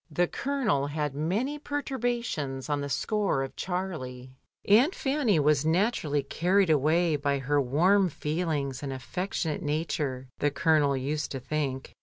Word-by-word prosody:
The 175 +3 +1
Colonel 250 - 0
had 150 -1 -2
many 205 - -1
perturbations 240 - -3
on 145 -1 0
the 140 - -4
score 195 0 0
of 135 - -7
Charlie. 155 -9 -4 0.4
Aunt 245 - +5
Fanny 265 - +1
was 150 -1 +3
naturally 160 - +1
carried 180 +5 +2
away 155 +3 +3
by 140 0 0
her 140 +2 +1
warm 180 +9 +3
feelings 150 -4 -2
and 140 -2 -4
afifectionate 160 +4 -3
nature, 145 -4 -2
the 145 - +2
Colonel 145 -2 +2
used 145 +4 -2
to 135 - -3
think. 135 -1 -3
155 Hz, 140 wpm, -28 LUFS, 140-190 Hz, 0.4 s, Aunt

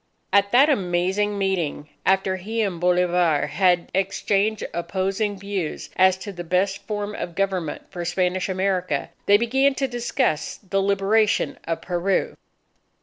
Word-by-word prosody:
At 200 0 +4
that 265 +4 +6
Amazing 195 - 0
Meeting, 180 -7 -1 0.2
after 190 0 +2
he 220 +5 -3
and 185 -5 -2
Bolivar 180 -3 +2
had 180 -2 +1
exchanged 195 +2 0
opposing 190 +4 -2
views 195 -4 -4
as 185 0 +4
to 200 +2 -7
the 175 -1 -6
best 190 +3 0
form 205 -1 -3
of 175 -4 -6
government 190 -5 -2
for 175 -2 -5
Spanish 180 +2 0
America, 185 -5 -1 0.2
they 205 - +7
began 265 +5 +2
to 270 0 0
discuss 240 - -1
the 195 -1 -2
liberation 200 +2 +1
of 165 0 -3
Peru. 180 +2 0
190 Hz, 140 wpm, -23 LUFS, 180-205 Hz, 0.2 s, they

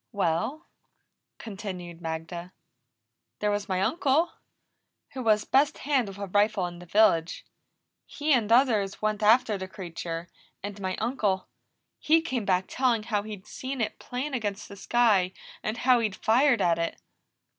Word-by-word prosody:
"Well," 200 - -1 0.7
continued 185 -5 -7
Magda, 165 +2 -5 0.8
"there 210 0 0
was 205 0 -2
my 185 0 0
uncle, 290 - +2 0.8
who 260 - -4
was 215 -3 +3
best 280 +2 +3
hand 270 -5 +1
with 195 0 -8
a 200 - -4
rifle 205 0 +2
in 175 -1 -7
the 180 - -12
village. 170 -4 +3 0.6
He 295 +1 0
and 225 -4 +2
others 225 -6 +3
went 215 -1 0
after 215 -1 +4
the 190 - -5
creature, 170 -2 -6 0.4
and 205 0 -6
my 185 -1 -2
uncle, 210 -5 -1 0.5
he 320 +2 +4
came 260 -9 -3
back 185 -1 +2
telling 245 -4 +1
how 210 -2 0
he'd 205 -2 -8
seen 265 +3 -6
it 220 -2 -2
plain 260 +4 -4
against 210 -4 -3
the 200 - -10
sky, 200 -3 +2 0.3
and 215 +2 -3
how 250 0 +4
he'd 215 -4 -1
fired 240 +1 +3
at 170 -1 +2
it. 165 - -2
210 Hz, 155 wpm, -27 LUFS, 185-245 Hz, 0.8 s, after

